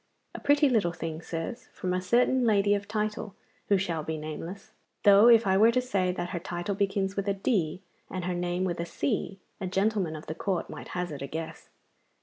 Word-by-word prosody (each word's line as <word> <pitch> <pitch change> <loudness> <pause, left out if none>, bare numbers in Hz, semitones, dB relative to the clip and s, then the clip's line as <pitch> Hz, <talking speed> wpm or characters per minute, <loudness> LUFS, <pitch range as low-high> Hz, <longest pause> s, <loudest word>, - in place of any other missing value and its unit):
A - - -6
pretty 290 +1 +4
little 215 -9 +2
thing, 165 -1 -5
sirs, 165 +9 -5
from 180 -1 -2
a 185 - 0
certain 245 +6 +3
lady 205 -3 +3
of 200 0 -2
title, 210 -2 -3 0.3
who 200 - +5
shall 170 -4 -1
be 160 +1 -4
nameless; 165 +6 -7 0.3
though, 205 +2 +8
if 230 -2 +7
I 190 -1 +3
were 220 +3 +6
to 255 - +2
say 200 -8 0
that 175 -1 -4
her 175 - -2
title 175 +2 -3
begins 195 0 0
with 200 0 -2
a 200 - +1
D 190 -4 0 0.3
and 185 -2 -4
her 180 - -1
name 175 +1 -1
with 175 -2 -2
a 170 - -1
C, 165 +6 -2 0.2
a 190 - -3
gentleman 195 -3 0
of 155 - -8
the 155 - -4
Court 180 +2 -2
might - - -8
hazard 175 -5 -3
a 140 - -4
guess. 160 +2 -6
190 Hz, 210 wpm, -28 LUFS, 170-205 Hz, 0.3 s, though